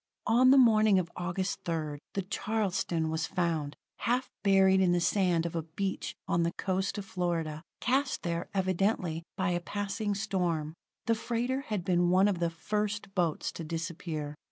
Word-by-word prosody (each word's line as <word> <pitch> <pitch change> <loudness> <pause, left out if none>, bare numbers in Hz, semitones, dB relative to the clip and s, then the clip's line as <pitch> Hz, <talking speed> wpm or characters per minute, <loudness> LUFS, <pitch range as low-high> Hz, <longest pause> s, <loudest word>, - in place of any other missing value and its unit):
On 250 +3 +5
the 270 - +7
morning 215 -5 +6
of 175 -2 -1
August 185 +1 -2
3rd, 155 -3 -2 0.2
the 195 - 0
Charleston 185 -5 -1
was 160 0 -1
found, 160 -5 -1 0.2
half 250 +2 0
buried 190 -1 +5
in 180 -2 +4
the 175 - +3
sand 175 -2 +2
of 170 - -3
a 165 - 0
beach 190 +5 -4
on 170 - +2
the 170 +1 0
coast 190 +2 -1
of 200 - -4
Florida, 165 -5 -2 0.2
cast 265 +2 +1
there, 170 -1 -2
evidently, 185 -3 0 0.2
by 190 -2 +1
a 175 - +1
passing 205 +3 -2
storm. 175 -6 -1 0.3
The 230 - +3
freighter 240 +3 -1
had 205 -5 -2
been 175 -1 +3
one 185 +3 +5
of 195 -4 0
the 170 -1 +1
first 210 +4 -3
boats 170 -5 0
to 165 - -7
disappear. 160 -2 -4
185 Hz, 170 wpm, -30 LUFS, 170-205 Hz, 0.3 s, the